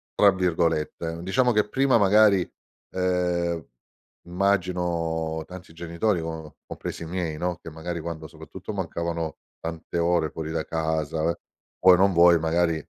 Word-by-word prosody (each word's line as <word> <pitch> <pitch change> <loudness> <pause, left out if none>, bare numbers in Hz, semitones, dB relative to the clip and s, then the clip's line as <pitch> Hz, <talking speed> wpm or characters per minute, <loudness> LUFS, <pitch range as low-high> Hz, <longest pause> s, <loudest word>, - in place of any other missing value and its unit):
tra 100 -1 +6
virgolette. 85 -2 -1
Diciamo 125 +8 +2
che 105 -2 +1
prima 135 0 +3
magari, 100 -2 +5 0.4
ehm, 90 -2 0 0.7
immagino 85 -4 0
tanti 90 -2 -11
genitori, 85 +3 -1
co 80 -2 -7
compresi - - -6
i - - -6
miei 85 -3 -3
no, 90 +1 -2
che - - -8
magari 85 +2 -5
quando, 80 -1 -6
soprattutto, 80 +5 -9
mancavano 85 -3 -3 0.2
tante 85 +1 -5
ore 85 -2 +1
fuori 80 -1 -5
da 80 -1 -2
casa, 80 0 -1
eh, 85 - 0 0.4
vuoi 95 0 +7
o - - 0
non 95 +1 +4
vuoi 85 0 +6
magari 85 +1 +1
85 Hz, 145 wpm, -25 LUFS, 80-90 Hz, 0.7 s, vuoi